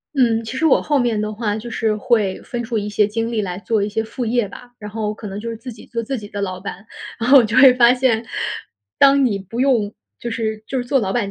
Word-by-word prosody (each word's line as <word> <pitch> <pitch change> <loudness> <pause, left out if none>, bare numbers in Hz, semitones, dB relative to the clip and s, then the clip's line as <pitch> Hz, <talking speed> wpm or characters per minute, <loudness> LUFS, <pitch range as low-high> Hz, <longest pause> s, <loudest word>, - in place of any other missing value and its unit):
嗯， 230 -4 +2
其 230 +4 -6
实 320 - +1
我 315 - +4
后 290 -2 +1
面 235 -4 +1
的 215 0 -2
话 210 -1 -2
就 220 +2 -6
是 220 -1 0
会 215 -4 0
分 240 - -5
出 230 0 -2
一 210 0 -2
些 210 0 +2
精 225 +2 -2
力 225 -2 0
来 180 -3 -4
做 215 +2 0
一 200 - 0
些 220 +1 -2
副 240 +3 -5
业 235 0 +1
吧， 245 +3 -12
然 210 -2 -8
后 215 -1 -2
可 215 - -11
能 195 +1 -6
就 230 +2 -5
是 230 - -4
自 245 +3 -8
己 225 - -13
做 230 -1 -4
自 265 +4 -3
己 210 -2 -8
的 205 0 -5
老 185 -2 -3
板。 195 +1 -8 0.3
然 230 +2 -2
后 280 - +9
我 250 - +7
就 220 - -3
会 260 -1 +8
发 245 -1 +6
现， 250 -3 +1 0.7
当 275 0 +6
你 205 -5 0
不 195 +6 -5
用 235 -7 +2 0.3
就 240 - -4
是 220 -1 -3
就 270 - -3
是 250 - -1
做 255 +2 +1
老 195 -3 -2
板 240 - +1
225 Hz, 295 characters per minute, -20 LUFS, 210-245 Hz, 0.7 s, 后